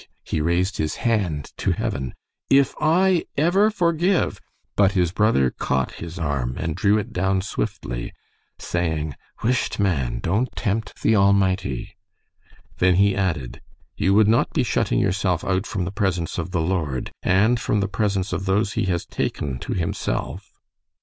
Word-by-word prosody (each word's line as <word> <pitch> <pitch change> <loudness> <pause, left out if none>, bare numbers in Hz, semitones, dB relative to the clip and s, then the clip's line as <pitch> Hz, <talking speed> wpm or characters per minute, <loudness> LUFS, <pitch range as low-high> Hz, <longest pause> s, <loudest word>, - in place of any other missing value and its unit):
he 80 - -2
raised 90 +4 +1
his 75 -1 -1
hand 95 - 0
to - - +1
heaven. 65 -2 -3 0.3
"If 135 0 +4
I 175 +3 +3
ever 180 +8 +4
forgive 175 -2 +1 0.2
" - - -48
But 100 -1 +4
his 90 -4 +2
brother 95 - +2
caught 65 -1 -1
his 85 +1 -7
arm 70 -7 -2
and 80 -1 -2
drew 105 +1 +3
it 105 - -4
down 95 +1 +1
swiftly, - - -4 0.5
saying: 80 -4 -2 0.3
"Whisht, 125 -1 0
man. 70 -13 0
Don't 100 - 0
tempt 110 0 -3
the 110 - +4
Almighty." 100 +1 +1 0.8
Then 90 0 +4
he 100 +1 +4
added, 75 -11 -2 0.3
"You 95 +1 +2
would 105 0 +5
not 115 +2 +3
be - - +2
shutting - - 0
yourself 95 -1 +1
out 95 +2 0
from 95 -4 -2
the 90 - -4
presence 95 -5 -1
of 85 - -3
the 90 -2 -1
Lord 80 -7 -2
and 110 +6 +3
from 105 - 0
the 100 - 0
presence 95 -1 -1
of 90 +2 -2
those 100 +2 +1
he - - 0
has 90 -3 -1
taken 65 -3 -3
to - - -4
himself?" 85 -3 -3
95 Hz, 160 wpm, -23 LUFS, 85-105 Hz, 0.8 s, would